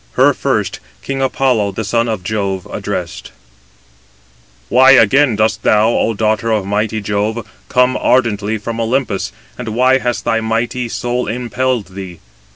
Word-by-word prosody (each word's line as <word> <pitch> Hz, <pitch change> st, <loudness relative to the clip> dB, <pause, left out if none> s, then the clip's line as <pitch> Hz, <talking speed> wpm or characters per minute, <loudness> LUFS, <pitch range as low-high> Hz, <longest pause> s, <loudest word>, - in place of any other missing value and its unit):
Her -, -, +4 dB
first -, -, -1 dB, 0.2 s
king 135 Hz, 0 st, -3 dB
Apollo, 125 Hz, -6 st, +1 dB
the 110 Hz, -, -3 dB
son 115 Hz, +3 st, 0 dB
of 110 Hz, -5 st, -3 dB
Jove, 100 Hz, -2 st, -2 dB
addressed: -, -, -5 dB, 1.4 s
"Why 130 Hz, +2 st, +6 dB
again 130 Hz, +1 st, +4 dB
dost 110 Hz, +1 st, +1 dB
thou, 110 Hz, +1 st, +3 dB
O 115 Hz, -1 st, 0 dB
daughter 110 Hz, +1 st, 0 dB
of 105 Hz, -3 st, 0 dB
mighty 105 Hz, +2 st, -1 dB
Jove, 105 Hz, +2 st, -2 dB, 0.2 s
come 125 Hz, 0 st, +3 dB
ardently 110 Hz, -4 st, +1 dB
from 115 Hz, +2 st, -4 dB
Olympus, 115 Hz, -3 st, -1 dB, 0.3 s
and 120 Hz, -2 st, -4 dB
why 130 Hz, +2 st, +4 dB
has 120 Hz, -2 st, -2 dB
thy 115 Hz, -, +1 dB
mighty 115 Hz, +2 st, -2 dB
soul 120 Hz, +2 st, -2 dB
impelled 125 Hz, 0 st, -2 dB
thee? 95 Hz, -3 st, -8 dB
115 Hz, 145 wpm, -16 LUFS, 105-125 Hz, 1.4 s, Why